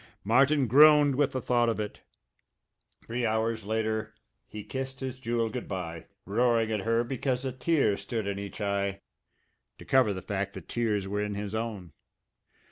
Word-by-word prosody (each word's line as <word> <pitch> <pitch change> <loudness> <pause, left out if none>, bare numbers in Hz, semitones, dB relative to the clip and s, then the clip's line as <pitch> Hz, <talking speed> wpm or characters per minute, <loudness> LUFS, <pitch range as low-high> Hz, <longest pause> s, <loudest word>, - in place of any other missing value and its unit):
Martin 135 +6 +4
groaned 145 +3 +7
with 140 +1 +1
the 130 - -2
thought 120 -1 +2
of 115 - -1
it. 105 -1 -5 1.0
Three 120 +2 -3
hours 110 -1 0
later 110 0 -1 0.3
he 105 -1 -8
kissed 135 +2 -5
his 130 -1 -5
Jewel 115 -2 -1
good 125 +1 -5
bye, 85 -4 -5 0.2
roaring 115 +1 +2
at 110 - 0
her 115 +3 +1
because 130 +1 -2
a 130 - -1
tear 135 -4 +1
stood 105 +2 -4
in 100 0 -3
each 100 +1 -7
eye 100 -1 -1 0.8
to - - -12
cover 130 -5 +4
the 95 -2 -5
fact 100 0 -3
that - - -9
tears 105 -5 -1
were 105 +1 -2
in 105 -1 -3
his 100 0 -5
own. 110 -7 -4
110 Hz, 170 wpm, -28 LUFS, 100-125 Hz, 1.0 s, groaned